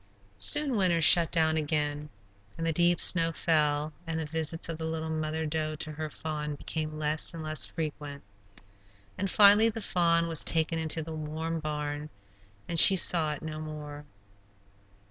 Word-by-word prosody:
Soon 275 - +4
winter 180 -5 +1
shut 165 +1 +6
down 160 -2 +1
again, 150 -1 -2 0.5
and 165 - -4
the 165 - 0
deep 175 +1 +2
snow 165 -2 +4
fell, 150 -2 0
and 160 0 -3
the 160 - -4
visits 160 +1 -4
of 165 -1 -6
the 160 - -4
little 160 0 -5
mother 155 0 -3
doe 155 0 -2
to 155 0 -4
her 155 0 -6
fawn 150 -1 -6
became 155 +1 -5
less 155 +2 -3
and 160 - -7
less 155 -1 +1
frequent. 150 -3 -7 0.9
And 195 +1 -3
finally 210 +3 +6
the 225 - -6
fawn 170 -2 +1
was 165 -2 0
taken 165 0 0
into 160 0 -1
the 160 +1 -8
warm 160 +1 -5
barn, 150 -1 -5 0.6
and 170 - +2
she 195 - +8
saw 165 -4 +3
it 150 - -10
no 155 -1 -6
more. 150 -1 -9
160 Hz, 165 wpm, -28 LUFS, 150-165 Hz, 0.9 s, she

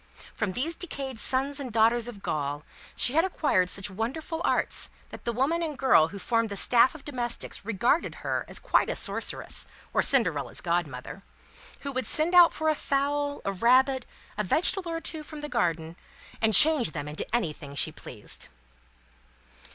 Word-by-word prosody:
From 210 -4 -3
these 310 - -2
decayed 275 -9 -5
sons 270 +5 +1
and 260 -3 -6
daughters 230 +1 +2
of 210 -5 -10
Gaul, 145 0 -3 0.3
she 245 - +2
had 325 +2 +3
acquired 290 - +1
such 195 +1 +1
wonderful 275 - -4
arts, - - 0 0.2
that - - -12
the 235 - 0
woman 275 +8 0
and 310 -4 -4
girl 260 -13 +4
who 200 - -9
formed 230 +3 0
the 200 - -5
staff 245 +7 +4
of 300 - -12
domestics 245 -7 -3
regarded 230 - 0
her - - -1
as - - -4
quite - - +1
a - - -2
Sorceress, - - -1 0.3
or - - +3
Cinderella's 170 - 0
Godmother: 165 -7 -3 0.6
who 280 - -4
would 260 -4 -2
send 320 +3 +3
out 350 -1 +8
for 315 - -3
a 310 - +4
fowl, 285 0 -2
a 195 - -1
rabbit, 255 +5 +2 0.3
a - - +1
vegetable 345 - +1
or 330 0 -4
two 320 -1 -3
from 300 0 -10
the 295 - -5
garden, 165 - -1 0.5
and 220 -1 +5
change 305 - +7
them 145 -2 -5
into 150 +1 -4
anything 150 -9 -4
she 155 - +2
pleased. 120 -8 -9
245 Hz, 175 wpm, -27 LUFS, 185-290 Hz, 0.6 s, out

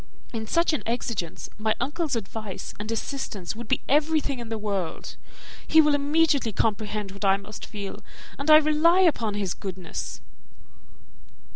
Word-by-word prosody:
In 220 -1 -4
such 335 +6 +2
an 305 - 0
exigence 230 -7 -3
my 215 0 +1
uncle's 295 +3 -1
advice 215 -2 -5
and 215 +2 -4
assistance 225 -6 -3
would 235 0 -7
be 265 - +1
everything 295 -2 +2
in 235 -1 -7
the 225 - -2
world; 200 -5 -3 0.5
he 320 - +6
will 300 -1 +6
immediately 290 -3 +2
comprehend 210 -1 -1
what 200 +1 -8
I 195 0 +5
must 200 +2 -9
feel, 200 -2 -6 0.4
and 280 +2 -2
I 305 - +11
rely 310 +4 +4
upon 235 - +2
his 200 -3 -1
goodness." 185 -3 -6
225 Hz, 150 wpm, -26 LUFS, 205-295 Hz, 0.5 s, I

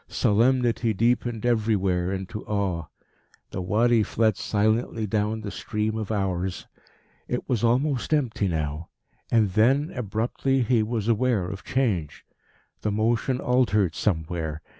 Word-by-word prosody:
Solemnity 115 0 +2
deepened 120 +1 0
everywhere 100 -6 +1
into 95 +3 -5
awe. 95 -6 -1 0.6
The - - -4
Wadi 110 +5 +3
fled 110 0 +1
silently 110 +2 0
down 110 +1 -1
the 105 -2 -5
stream 105 +3 -2
of 110 -1 -3
hours. 95 -3 -2 0.6
It 125 - -3
was 120 -5 0
almost 125 +2 +1
empty 125 -9 +1
now. 80 -1 -3 0.4
And 110 -4 +3
then, 135 - +3
abruptly, 120 +4 -1
he 115 0 +2
was 110 -1 -2
aware 115 -3 +2
of 95 +1 -7
change. 105 - -1 0.6
The 105 - -1
motion 115 +4 +1
altered 105 -9 +2
somewhere. 80 -4 -2
110 Hz, 125 wpm, -25 LUFS, 95-120 Hz, 0.6 s, Wadi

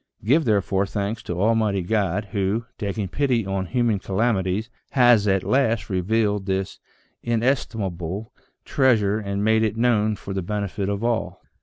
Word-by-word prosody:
Give 145 +7 +3
there 105 -4 +2
fore 95 0 0
thanks 105 +3 -3
to 90 0 -5
Almighty 105 -2 +2
God, 100 0 -1
who, 105 +2 -1
taking 100 -1 -2
pity 125 - 0
on 95 -1 -2
human 120 -4 +1
calamities, 100 0 0 0.3
has 120 -5 +5
at 95 -1 +2
last 115 -5 +1
revealed 100 +1 0
this 95 0 -2 0.4
inestimable 110 -6 -2 0.3
treasure, 110 -6 +2
and 100 -1 -3
made 110 +1 +3
it 110 -1 0
known 110 -3 +2
for 100 -1 -7
the 95 - -2
benefit 100 +1 -3
of 100 +2 -2
all." 115 -1 -2
105 Hz, 150 wpm, -23 LUFS, 95-115 Hz, 0.4 s, has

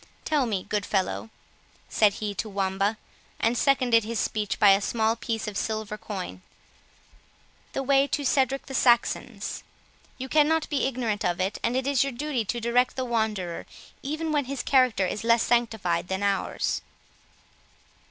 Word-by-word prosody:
—Tell 290 -5 +1
me, 195 -5 -1
good 210 -1 -1
fellow," 190 +3 -1 0.6
said 210 -2 +3
he 210 0 -4
to 215 +2 -4
Wamba, 195 +2 0 0.4
and 230 +2 +2
seconded 245 -4 +3
his 225 0 -3
speech 210 -2 -1
by 205 - +7
a 195 +1 +4
small 220 +1 +1
piece 225 -1 -3
of 210 - -5
silver 215 0 -2
coin, 190 - -6 1.3
"the 270 - -2
way 275 +1 +4
to 285 0 -2
Cedric 270 0 +1
the 270 - -8
Saxon's; 240 -3 +1 0.5
you 260 0 -5
cannot 310 +2 +3
be 285 -3 +1
ignorant 235 -5 -2
of 175 0 0
it, 190 +3 -1
and 240 +2 +1
it 260 - -1
is 275 -2 +3
your 275 -1 -3
duty 270 -1 -2
to 240 +4 -2
direct 240 +2 +1
the 260 - -2
wanderer 215 -7 -2 0.3
even 310 +3 -3
when 290 -3 +1
his 275 0 -4
character 255 -7 +3
is 205 +4 -3
less 230 0 +4
sanctified 220 -8 0
than 190 +2 -2
ours." 200 -1 0
230 Hz, 160 wpm, -26 LUFS, 205-265 Hz, 1.3 s, by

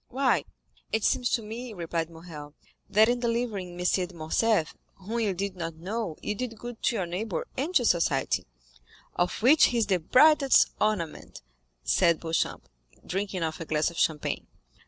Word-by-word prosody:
"Why, 260 +1 +1 0.5
it 220 -1 0
seems 245 -1 +2
to 230 - +1
me," 230 +2 -7
replied 165 -2 -3
Morrel, 160 -3 -10 0.3
"that 215 +2 +5
in 245 +1 +1
delivering 230 -7 -2
M. 180 - -3
de 180 -1 0
Morcerf, 165 +3 +1 0.2
whom 215 +5 -4
you 205 -5 0
did 195 +1 -3
not 165 -2 -5
know, 185 +1 -4
you 210 - -1
did 230 +1 -5
good 240 +1 -8
to - - +1
your 190 -5 -1
neighbor 180 +2 -3
and 310 +8 -3
to 245 - +4
society." 170 -5 +1 0.7
"Of 180 +4 -1
which 295 +6 +7
he 245 - 0
is 230 - +3
the 190 -3 +1
brightest 275 - +5
ornament," 195 - -2 0.4
said 170 - +3
Beauchamp, 165 0 -2 0.4
drinking 190 -1 -2
off 160 -1 -3
a - - -4
glass 155 +2 0
of 170 - -12
champagne. 150 -2 0
195 Hz, 170 wpm, -27 LUFS, 170-230 Hz, 0.7 s, which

